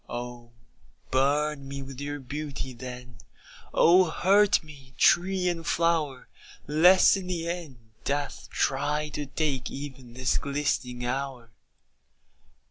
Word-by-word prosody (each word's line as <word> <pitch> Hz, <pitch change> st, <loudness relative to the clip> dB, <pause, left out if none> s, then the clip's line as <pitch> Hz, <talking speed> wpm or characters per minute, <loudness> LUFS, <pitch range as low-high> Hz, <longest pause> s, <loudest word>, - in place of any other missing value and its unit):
Oh 120 Hz, 0 st, -6 dB, 0.6 s
burn 140 Hz, +2 st, +1 dB
me 140 Hz, 0 st, -6 dB
with 135 Hz, 0 st, -9 dB
your 145 Hz, 0 st, -4 dB
beauty, 140 Hz, -1 st, -5 dB
then, 125 Hz, 0 st, -9 dB, 0.5 s
Oh 180 Hz, +2 st, +6 dB
hurt 195 Hz, +4 st, +4 dB
me, 135 Hz, -5 st, -15 dB
tree 185 Hz, +1 st, +3 dB
and 170 Hz, -2 st, -1 dB
flower, 165 Hz, -6 st, 0 dB, 0.4 s
Lest 175 Hz, +8 st, +6 dB
in 190 Hz, -2 st, -5 dB
the 170 Hz, -2 st, -3 dB
end 170 Hz, -7 st, -5 dB, 0.3 s
death 145 Hz, 0 st, -3 dB
try 150 Hz, +2 st, 0 dB
to 145 Hz, -1 st, -5 dB
take 140 Hz, -3 st, -2 dB
Even 135 Hz, -4 st, -8 dB
this 130 Hz, -1 st, +1 dB
glistening 135 Hz, -4 st, -2 dB
hour. 130 Hz, -2 st, -4 dB
145 Hz, 120 wpm, -27 LUFS, 130-165 Hz, 0.6 s, Oh